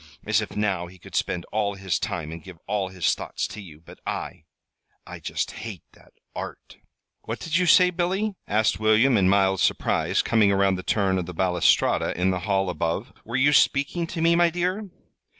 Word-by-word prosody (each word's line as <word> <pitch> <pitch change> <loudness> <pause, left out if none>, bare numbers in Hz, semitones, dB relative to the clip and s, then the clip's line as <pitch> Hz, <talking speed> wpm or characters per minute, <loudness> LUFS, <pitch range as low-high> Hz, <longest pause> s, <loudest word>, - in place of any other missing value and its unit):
As 110 0 +2
if 105 - -7
now 100 -4 -1
he 90 +2 -14
could - - -15
spend 85 -1 -1
all 105 -2 -1
his 95 -2 -2
time 80 -3 -4
and 80 -1 -8
give 90 -1 -11
all 100 -2 -1
his 90 -3 +1
thoughts - - -4
to 100 +2 -8
you! 80 -6 -13
But 80 - -15
I - - -5 0.6
I - - -9
just - - -3
hate 110 -6 -8
that - - -22 0.2
Art!" - - -8 0.5
"What - - -4
did 165 -1 -3
you 180 -1 +1
say, 180 +1 +6
Billy?" 190 +4 -1
asked 110 +1 +1
William, 110 +4 +4
in 95 -3 +3
mild 95 -1 +3
surprise, - - +1
coming 110 -3 +3
around 100 0 +3
the 90 - -3
turn 95 -1 +1
of 85 - -4
the 90 - -7
balustrade 90 -2 +2
in 90 +1 +2
the 90 - -2
hall 95 -2 +1
above. 85 - -3
"Were 115 - -6
you 145 +3 +4
speaking 145 +5 +2
to 165 -1 -5
me, 170 0 +4
my 175 0 +4
dear?" 180 +4 -2
100 Hz, 200 wpm, -24 LUFS, 95-140 Hz, 0.6 s, say